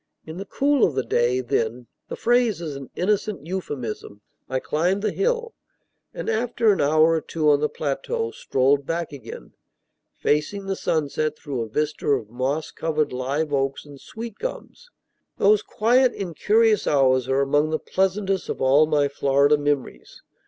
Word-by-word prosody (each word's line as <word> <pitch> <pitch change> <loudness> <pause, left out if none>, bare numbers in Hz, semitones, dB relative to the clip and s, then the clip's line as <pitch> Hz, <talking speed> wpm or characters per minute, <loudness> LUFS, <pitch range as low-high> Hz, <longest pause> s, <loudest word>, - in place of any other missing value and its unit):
In 160 +2 -8
the 195 - -6
cool 280 +2 +2
of 150 - +2
the 130 - 0
day, 125 +2 +1
then 120 0 -2 0.2
(the - - -4
phrase 240 -5 +2
is 155 -4 -5
an 135 -1 -8
innocent 205 -2 -1
euphemism), 130 - -5 0.3
I 130 - 0
climbed 180 +9 0
the - - +1
hill, 470 +2 -1 0.6
and - - -7
after 230 0 +2
an 195 - +1
hour 155 +3 +4
or 165 -1 +1
two 155 -2 +1
on 145 - +3
the 150 - 0
plateau 450 - -3
strolled 140 - +1
back 170 -1 -2
again, 140 - -10 0.6
facing 150 +7 0
the 195 0 -2
sunset 155 -2 -1
through 135 -5 -4
a 115 - -4
vista 150 +6 -2
of 125 -7 0
moss 135 +6 -2
covered 155 -4 -1
live 140 +4 -2
oaks 135 0 -1
and 145 -2 -13
sweet 225 -1 -8
gums. - - -7 0.5
Those 210 +1 +4
quiet, 245 +5 +2
incurious 210 +4 +1
hours 130 -3 +3
are 135 +1 +2
among 145 +2 +2
the 155 - 0
pleasantest 190 +1 -1
of - - -3
all 140 +4 +4
my 150 -2 +2
Florida 140 +1 +3
memories. 145 -2 -3
155 Hz, 165 wpm, -23 LUFS, 140-205 Hz, 0.6 s, hour